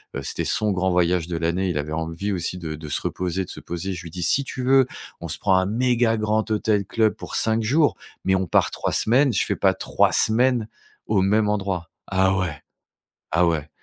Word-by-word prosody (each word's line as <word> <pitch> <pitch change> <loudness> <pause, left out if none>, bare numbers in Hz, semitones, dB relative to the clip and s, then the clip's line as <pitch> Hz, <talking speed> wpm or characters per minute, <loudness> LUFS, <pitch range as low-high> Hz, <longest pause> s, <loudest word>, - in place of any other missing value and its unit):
heu, 70 - -4
c'était - - -3
son 105 -1 +2
grand 95 0 0
voyage 90 -1 +1
de 85 -2 -3
l'année. 85 +3 0
Il 85 - -2
avait 75 +1 -3
envie 80 +5 -3
aussi 90 0 -2
de 80 -3 -5
de 75 0 -8
se - - 0
reposer, 90 +1 -2
de - - -14
se - - -8
poser. 90 +3 -5
Je 90 - -6
lui 85 - -9
dis: 90 +1 -5
«Si 140 +11 +3
tu 130 -1 -6
veux, 130 0 +4 0.3
on - - -5
se - - -2
prend 95 -2 +2
un 95 - +2
méga 120 0 +1
grand 110 +1 0
hôtel 105 -2 +1
club 110 +1 +1
pour - - -7
5 110 0 +2
jours, 145 +7 +2 0.3
mais 95 - +2
on 95 -1 0
part - - +2
3 - - -2
semaines, 130 +4 +3
je - - +1
fais - - -1
pas - - +2
3 - - +1
semaines 120 0 +2 0.4
au 105 -3 +1
même 105 +2 +2
endroit». 95 -5 -2 0.2
Ah 95 0 +2
ouais! 85 -7 -3 0.7
Ah 85 +2 +3
ouais. 80 -3 -1
95 Hz, 225 wpm, -23 LUFS, 85-110 Hz, 0.7 s, veux